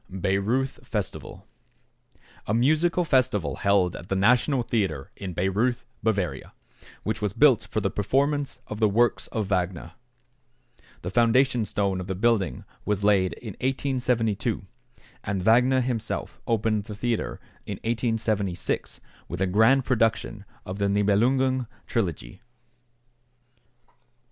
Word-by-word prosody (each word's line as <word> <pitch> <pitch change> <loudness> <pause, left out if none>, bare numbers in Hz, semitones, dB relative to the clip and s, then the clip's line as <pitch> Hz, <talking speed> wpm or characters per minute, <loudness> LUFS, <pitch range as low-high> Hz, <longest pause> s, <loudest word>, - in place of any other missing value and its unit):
=Bayreuth 100 +8 -1
Festival.= - - -5 1.0
A 105 - +1
musical 155 +8 +3
festival 130 - +1
held 100 -3 +2
at 85 - -10
the 95 - 0
National 125 +6 +3
Theatre 95 - -2
in 95 -3 -6
Bayreuth, 105 +8 0 0.2
Bavaria, 95 -11 -1 0.5
which 110 - -2
was 105 -2 -1
built 120 -5 +4
for 110 -1 -1
the 100 - 0
performance 140 +7 0
of 105 - -7
the 110 -2 +4
works 120 +4 +2
of 110 -3 -2
Wagner. 90 -3 -2 1.1
The 90 - -4
foundation 120 +1 +3
stone 100 -3 -1
of 90 - -7
the 95 - -2
building 100 - +1 0.2
was 105 -1 -1
laid 100 -3 +3
in 115 -4 -8
1872, 125 -5 0 0.6
and 100 -2 -2
Wagner 125 +5 +4
himself 120 -3 -3
opened 110 -2 +1
the 105 - -7
theatre 115 +1 -2 0.3
in - - -3
1876 115 -5 -1 0.3
with 90 - -5
a 95 - +2
grand 110 +8 +4
production 110 -4 0 0.2
of 95 +2 -6
the 100 - +2
"Nibelungen 120 +6 +2 0.2
Trilogy." 85 - -3
110 Hz, 125 wpm, -26 LUFS, 100-125 Hz, 1.1 s, built